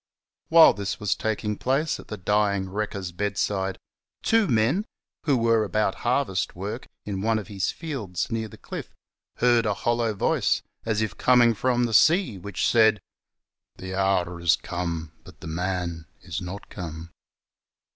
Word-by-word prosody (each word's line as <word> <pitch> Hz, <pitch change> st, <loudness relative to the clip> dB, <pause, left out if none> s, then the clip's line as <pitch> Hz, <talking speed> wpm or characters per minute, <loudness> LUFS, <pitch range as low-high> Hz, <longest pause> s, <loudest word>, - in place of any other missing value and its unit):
Whilst 165 Hz, -7 st, +7 dB
this 100 Hz, -1 st, -3 dB
was 105 Hz, -1 st, +1 dB
taking 105 Hz, -1 st, -2 dB
place 140 Hz, +5 st, 0 dB
at -, -, -12 dB
the 105 Hz, -, -6 dB
dying 100 Hz, 0 st, +1 dB
wrecker's 100 Hz, -2 st, -3 dB
bedside, 95 Hz, 0 st, -1 dB, 0.5 s
two 225 Hz, -2 st, +3 dB
men, 120 Hz, -, +2 dB, 0.4 s
who 140 Hz, -5 st, +3 dB
were 115 Hz, -1 st, +3 dB
about 105 Hz, 0 st, 0 dB
harvest 120 Hz, -7 st, 0 dB
work 100 Hz, +7 st, -5 dB, 0.2 s
in 100 Hz, -2 st, -3 dB
one 110 Hz, +1 st, +2 dB
of 110 Hz, 0 st, -6 dB
his 95 Hz, -2 st, -1 dB
fields 130 Hz, -, -4 dB
near 110 Hz, -1 st, -2 dB
the -, -, -13 dB
cliff, -, -, -8 dB, 0.4 s
heard 120 Hz, -2 st, +3 dB
a 105 Hz, -, +1 dB
hollow 115 Hz, -1 st, 0 dB
voice, -, -, +1 dB, 0.2 s
as 110 Hz, -1 st, +1 dB
if 110 Hz, -, -5 dB
coming 120 Hz, -2 st, +5 dB
from 125 Hz, +2 st, +1 dB
the 115 Hz, -2 st, -1 dB
sea, 155 Hz, -, +4 dB
which 100 Hz, +1 st, -2 dB
said, 110 Hz, -2 st, +5 dB, 0.4 s
" -, -, -65 dB
The 95 Hz, 0 st, -6 dB
hour 95 Hz, -3 st, +1 dB
is 85 Hz, 0 st, +4 dB
come 85 Hz, -3 st, -4 dB
but -, -, -15 dB
the -, -, -10 dB
man 85 Hz, -1 st, -3 dB
is 90 Hz, -3 st, -5 dB
not 95 Hz, +3 st, -7 dB
come." 80 Hz, -2 st, -7 dB
105 Hz, 160 wpm, -25 LUFS, 95-115 Hz, 0.5 s, Whilst